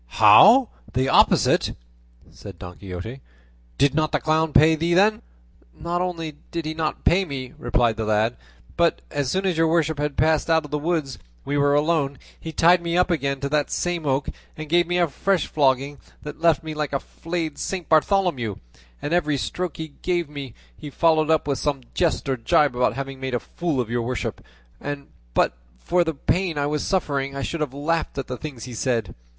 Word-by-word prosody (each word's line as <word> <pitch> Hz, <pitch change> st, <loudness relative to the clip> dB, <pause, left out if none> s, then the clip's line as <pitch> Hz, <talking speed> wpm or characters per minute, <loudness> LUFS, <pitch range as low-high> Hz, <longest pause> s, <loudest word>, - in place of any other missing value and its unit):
"How! 210 Hz, -, +7 dB, 0.2 s
the 130 Hz, +2 st, +1 dB
opposite?" -, -, +3 dB, 0.6 s
said -, -, -11 dB
Don 90 Hz, -1 st, -10 dB
Quixote; 100 Hz, +7 st, -7 dB, 0.6 s
"did 140 Hz, 0 st, +3 dB
not 155 Hz, 0 st, +1 dB
the -, -, +1 dB
clown 160 Hz, 0 st, +1 dB
pay 155 Hz, +2 st, +6 dB
thee 165 Hz, +2 st, 0 dB
then?" 215 Hz, +3 st, +4 dB, 0.6 s
"Not 175 Hz, +1 st, -2 dB
only 165 Hz, -4 st, -4 dB
did 170 Hz, -2 st, -4 dB
he 155 Hz, -, -3 dB
not 160 Hz, -1 st, -3 dB
pay 185 Hz, +3 st, +3 dB
me," 135 Hz, -7 st, -6 dB
replied 120 Hz, -1 st, +1 dB
the 110 Hz, -, -2 dB
lad, 110 Hz, +2 st, +1 dB, 0.4 s
"but 170 Hz, -1 st, +1 dB
as 145 Hz, -3 st, -1 dB
soon 190 Hz, +7 st, -1 dB
as 180 Hz, -4 st, 0 dB
your 165 Hz, -, +4 dB
worship 160 Hz, -2 st, +1 dB
had 145 Hz, -1 st, -2 dB
passed 160 Hz, 0 st, +2 dB
out 160 Hz, -1 st, +3 dB
of 150 Hz, -, -12 dB
the 150 Hz, -, -1 dB
wood 165 Hz, +1 st, 0 dB
and 135 Hz, -2 st, -9 dB, 0.3 s
we 145 Hz, -, -2 dB
were 145 Hz, 0 st, +3 dB
alone, 145 Hz, -2 st, +1 dB, 0.2 s
he 160 Hz, -, -6 dB
tied 170 Hz, +2 st, +4 dB
me 170 Hz, 0 st, -1 dB
up 180 Hz, 0 st, +2 dB
again 140 Hz, -4 st, -1 dB
to 140 Hz, -, -1 dB
the 150 Hz, 0 st, +2 dB
same 175 Hz, -3 st, -2 dB
oak 135 Hz, +1 st, 0 dB, 0.3 s
and 155 Hz, -1 st, -7 dB
gave 175 Hz, +1 st, +3 dB
me 175 Hz, 0 st, 0 dB
a 175 Hz, -1 st, +3 dB
fresh 180 Hz, +4 st, 0 dB
flogging, 140 Hz, 0 st, +1 dB, 0.2 s
that 150 Hz, +1 st, -8 dB
left 165 Hz, -1 st, +3 dB
me 155 Hz, -1 st, -5 dB
like 150 Hz, -1 st, -3 dB
a 140 Hz, -, +1 dB
flayed 165 Hz, -2 st, -5 dB
Saint 185 Hz, -3 st, -4 dB
Bartholomew; 155 Hz, -, +2 dB, 0.5 s
and 145 Hz, -, -2 dB
every 155 Hz, -5 st, +1 dB
stroke 180 Hz, +5 st, -4 dB
he 160 Hz, -1 st, -5 dB
gave 175 Hz, -3 st, 0 dB
me 140 Hz, -4 st, -8 dB, 0.2 s
he 145 Hz, -, -9 dB
followed 155 Hz, +1 st, +2 dB
up 160 Hz, -2 st, +2 dB
with 140 Hz, -2 st, -1 dB
some 145 Hz, -2 st, -1 dB
jest 170 Hz, -4 st, 0 dB
or 135 Hz, -1 st, 0 dB
gibe 125 Hz, +3 st, +2 dB
about 125 Hz, 0 st, +1 dB
having 135 Hz, 0 st, -5 dB
made 130 Hz, -1 st, -3 dB
a -, -, 0 dB
fool 165 Hz, -1 st, -3 dB
of 120 Hz, -2 st, -2 dB
your 120 Hz, 0 st, 0 dB
worship, 125 Hz, +1 st, -4 dB, 0.4 s
and 145 Hz, -1 st, -6 dB, 0.3 s
but -, -, +2 dB, 0.2 s
for 175 Hz, -, +1 dB
the 160 Hz, -2 st, -3 dB
pain 175 Hz, +2 st, -1 dB
I 145 Hz, -, 0 dB
was 150 Hz, +1 st, -1 dB
suffering 140 Hz, -7 st, -1 dB
I 140 Hz, -, -3 dB
should 165 Hz, +3 st, -3 dB
have 150 Hz, -4 st, -1 dB
laughed 150 Hz, +4 st, -2 dB
at 135 Hz, -, -2 dB
the 125 Hz, -, -5 dB
things 135 Hz, -6 st, -8 dB
he 125 Hz, +1 st, -8 dB
said. 115 Hz, -5 st, -1 dB
150 Hz, 205 wpm, -23 LUFS, 135-170 Hz, 0.6 s, How